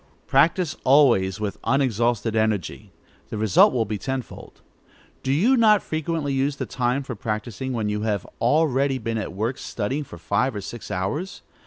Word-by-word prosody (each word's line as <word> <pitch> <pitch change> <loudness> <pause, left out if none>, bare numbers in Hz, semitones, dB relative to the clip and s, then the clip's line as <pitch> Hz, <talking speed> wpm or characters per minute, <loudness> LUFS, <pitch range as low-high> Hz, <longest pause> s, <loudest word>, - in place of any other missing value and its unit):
Practise 160 +4 +2
always 120 -9 +4
with 105 -2 -4
unexhausted 120 -3 +1
energy: 105 -2 -1 0.4
the - - -4
result 105 -3 +5
will 120 -3 0
be 105 -1 -4
tenfold. 130 +2 -6 0.6
Do 130 - -1
you 205 - +4
not 215 -5 +5
frequently 155 -2 -2
use 135 +1 0
the - - -4
time 125 +2 -1
for 130 - -6
practising, 110 +4 -4
when 110 -3 -1
you 105 0 -2
have 105 -3 -1 0.2
already 135 0 +2
been 115 -2 -3
at - - -4
work 110 +7 -3
studying 130 +7 -3
for 105 - -11
five 105 +8 0
or 105 - -4
six 120 +4 -8
hours? 145 - -3
120 Hz, 165 wpm, -23 LUFS, 105-140 Hz, 0.6 s, result